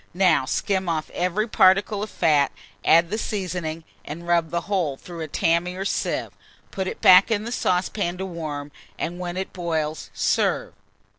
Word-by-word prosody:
Now 175 -7 +3
skim 190 +5 -1
off 155 -2 -2
every 185 +5 -1
particle 200 0 +3
of 215 - -4
fat, 150 -6 +2 0.3
add 170 +2 +4
the 215 - -1
seasoning, 180 -6 -3 0.2
and 170 +3 -8
rub 170 -2 +2
the 170 +1 -1
whole 175 -9 -1
through 175 +2 -10
a 160 - -3
tammy 170 +4 0
or 190 +1 -4
sieve; - - -1 0.4
put 190 -2 -3
it - - -6
back 185 +3 +8
in 215 -2 0
the 235 - -5
saucepan 180 -3 0
to 190 - -4
warm, 155 -5 -5 0.3
and 175 +2 -4
when 175 0 -4
it 190 - -4
boils, 160 -3 -3
serve. - - 0
175 Hz, 170 wpm, -24 LUFS, 160-190 Hz, 0.4 s, back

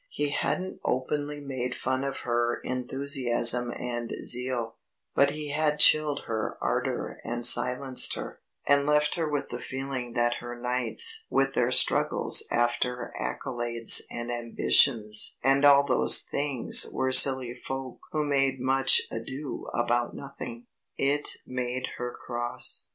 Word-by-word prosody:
He 145 - -3
hadn't 185 +6 -3
openly 145 +3 -3
made 130 -3 -5
fun 130 +1 -3
of 140 0 -5
her 120 0 -1
enthusiasm 125 -2 +1
and 120 -1 -5
zeal, 125 -2 -1 0.4
but 140 - +3
he 150 0 -6
had 150 0 0
chilled 150 -1 +3
her 110 -1 -4
ardour - - -3
and 120 0 -3
silenced 125 +1 +4
her, - - -8 0.3
and 140 0 +3
left 150 0 +2
her 165 -3 -2
with 145 -1 -3
the - - -6
feeling 130 -2 -6
that 120 0 0
her 120 0 -9
knights 440 - +1
with 135 0 0
their 120 -2 0
struggles 130 - +3
after 120 +1 -2
accolades 120 -3 +1
and 120 0 -6
ambitions 115 -2 +2
and 135 +1 +2
all 140 0 +6
those - - +5
things 140 -4 +2
were 130 0 -2
silly 130 -2 +6
folk 130 +1 -8
who 155 -1 -2
made 135 -2 0
much 135 +1 +3
ado 130 +5 -7
about 120 0 -1
nothing. 120 -4 -9 0.3
It 145 +2 0
made 125 0 -4
her 125 0 -4
cross. 120 0 0
130 Hz, 135 wpm, -26 LUFS, 120-140 Hz, 0.4 s, all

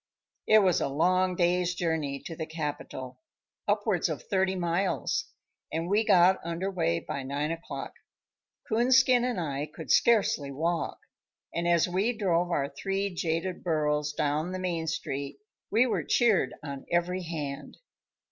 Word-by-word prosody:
It 215 -1 +6
was 185 -3 +3
a - - +1
long 180 +6 +2
day's 175 0 +1
journey 160 -5 -1
to 165 - -6
the 160 - -5
capital, 145 -5 -5 0.5
upwards - - +1
of - - -4
thirty 190 -1 +1
miles, 180 +2 0 0.5
and 165 +1 -2
we 205 +4 +3
got 185 -2 +5
under 170 +4 -3
way 170 -2 0
by 140 - -5
nine 140 +3 -2
o'clock. 165 +1 -6 0.7
Coonskin 250 +2 +4
and 245 -6 -1
I 145 -3 -2
could - - -6
scarcely 205 -11 +3
walk, 165 +5 -1 0.6
and 170 0 -1
as 170 -1 +4
we 200 +6 0
drove 175 -4 +1
our 140 -5 0
three 195 +2 -2
jaded 170 +1 -2
burros 150 -3 0
down 150 +3 -1
the - - -2
main 175 -3 -2
street 140 -3 -3 0.3
we 225 +5 +4
were 245 - 0
cheered 215 - +2
on 140 -2 -7
every 175 +2 +1
hand. 150 -4 -5
170 Hz, 145 wpm, -28 LUFS, 150-190 Hz, 0.7 s, It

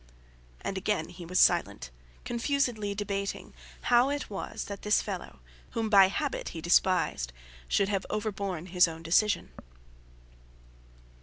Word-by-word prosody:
And 195 - -3
again 190 -5 -1
he 175 -1 -10
was 180 +2 +1
silent, - - +3 0.3
confusedly 240 -4 -1
debating 200 -1 -3 0.3
how 245 +2 +4
it 285 -5 -3
was 195 - -5
that 200 -1 -7
this 210 +1 +3
fellow, 180 - -6 0.4
whom 220 -1 -1
by 195 -2 +8
habit 285 +8 -3
he - - -3
despised, 170 - +2 0.4
should 200 - +2
have 195 -2 -1
overborne 200 -5 -3
his 180 -1 +4
own 165 0 -8
decision. 180 +3 +2
200 Hz, 130 wpm, -29 LUFS, 180-215 Hz, 0.4 s, by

